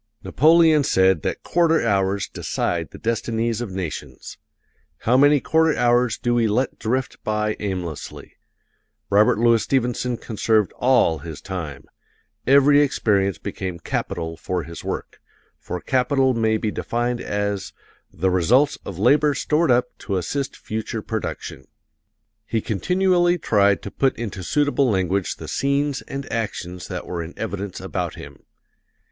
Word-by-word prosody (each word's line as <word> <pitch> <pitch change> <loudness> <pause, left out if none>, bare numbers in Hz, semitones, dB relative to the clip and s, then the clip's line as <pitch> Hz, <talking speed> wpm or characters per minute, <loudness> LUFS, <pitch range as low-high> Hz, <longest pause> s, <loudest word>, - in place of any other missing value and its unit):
Napoleon 160 0 +5
said 95 - +3
that - - -3
quarter 165 -5 +2
hours 100 -2 +1
decide 85 -2 -2
the - - -12
destinies 115 0 -1
of 120 - -4
nations. 90 -5 -6 0.6
How 120 - +2
many 145 +2 +5
quarter 160 +2 +2
hours 120 -1 +2
do 120 - 0
we 120 -1 +2
let 120 +5 -1
drift 130 +3 -2
by 105 0 -1
aimlessly! 90 -6 -5 0.8
Robert 105 +1 +4
Louis 115 0 +4
Stevenson 125 0 0
conserved 110 -2 0
all 125 -11 +3
his 80 -3 -8
time; 85 -7 -6 0.6
every 140 +2 +6
experience 100 - +1
became 95 -2 -5
capital 80 0 -4
for 90 -2 -3
his 85 +2 -9
work - - -5 0.4
for 90 - -5
capital 130 +3 +2
may 110 -2 +1
be 110 0 -2
defined 120 +2 -2
as 100 -1 -2 0.4
"the 95 +3 0
results 120 - +3
of 95 - -7
labor 145 +7 +3
stored 155 +1 +1
up 125 0 +2
to 100 -4 -2
assist 135 - -3
future 110 0 -5
production." 110 -1 -5 0.8
He 115 - 0
continually 175 - +2
tried 100 - +2
to 100 - -6
put 135 -1 0
into 105 -4 -5
suitable 145 - +1
language 95 -2 0
the - - -9
scenes 140 0 0
and 140 -1 -5
actions 90 -5 -4
that - - -5
were 85 -2 -4
in 85 +1 -8
evidence 100 -3 -4
about - - -4
him. - - -11
115 Hz, 140 wpm, -22 LUFS, 95-135 Hz, 0.8 s, every